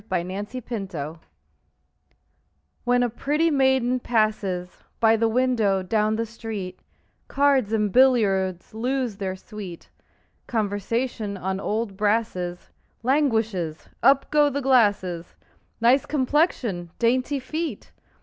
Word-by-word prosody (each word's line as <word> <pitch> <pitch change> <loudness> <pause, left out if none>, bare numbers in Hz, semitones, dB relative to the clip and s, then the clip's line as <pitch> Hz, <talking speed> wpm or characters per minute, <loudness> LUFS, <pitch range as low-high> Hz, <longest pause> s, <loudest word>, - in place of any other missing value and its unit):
Y 180 -2 0
Z 185 +1 -6
At 205 +1 -4
the 240 -4 -5
Club 160 -2 -6 1.7
When 245 0 +3
a 245 - +1
pretty 300 +7 +1
maiden 265 -3 +2
passes 210 -6 -1 0.2
By 225 0 +5
the 225 0 +2
window 225 -6 +2
down 215 +3 +1
the 230 +1 -1
street, 215 -5 -6 0.5
Cards 275 -6 +2
and 210 -2 +1
billiards 195 -8 +3
lose 245 -1 -2
their 190 -2 -3
sweet; 190 -3 -9 0.6
Conversation 215 0 -2
on 190 +1 -3
old 210 -1 -2
brasses 205 -5 -1 0.3
Languishes; 225 - 0
up 275 +2 +4
go 295 -1 +4
the 285 0 -2
glasses: 205 -10 +2 0.5
"Nice 250 +4 +4
complexion!" 260 - 0
"Dainty 255 +4 +1
feet!" 315 +5 -5
225 Hz, 115 wpm, -24 LUFS, 195-255 Hz, 1.7 s, By